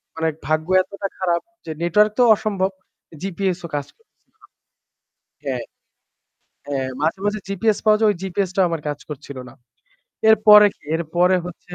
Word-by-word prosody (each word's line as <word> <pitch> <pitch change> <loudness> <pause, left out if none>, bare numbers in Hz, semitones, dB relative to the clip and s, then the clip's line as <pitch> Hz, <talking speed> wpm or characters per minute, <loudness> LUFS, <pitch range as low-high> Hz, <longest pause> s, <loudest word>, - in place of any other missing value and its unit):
মানে 160 0 -1 0.2
ভাগ্য 155 +1 0
এতটা 200 +1 -5
খারাপ 175 -2 0 0.2
যে 160 - -5
নেটওয়ার্ক 210 +5 +3
তো - - +6
অসম্ভব। 195 -3 -1 0.5
জিপিএস 190 -1 -2
ও - - -4
কাজ 145 -1 -3
করতেছিলোনা। 445 -1 -29 1.0
হ্যাঁ। - - -2 1.0
হ্যাঁ 135 -2 -2
মাঝে, 165 +5 0
মাঝে 210 +1 0
জিপিএস 200 +2 0
পাওয়া 215 0 +5
যায় 220 - +3
ওই - - -4
জিপিএস 190 0 -2
টাও 190 - +4
আমার 165 -2 -3
কাজ 145 0 -3
করছিল 140 -2 -8
না। - - -16 0.8
এরপরে 210 -1 +8
কি, - - -37
এরপরে 175 +3 +2
হচ্ছে 180 0 -10
185 Hz, 155 wpm, -21 LUFS, 160-205 Hz, 1.0 s, এরপরে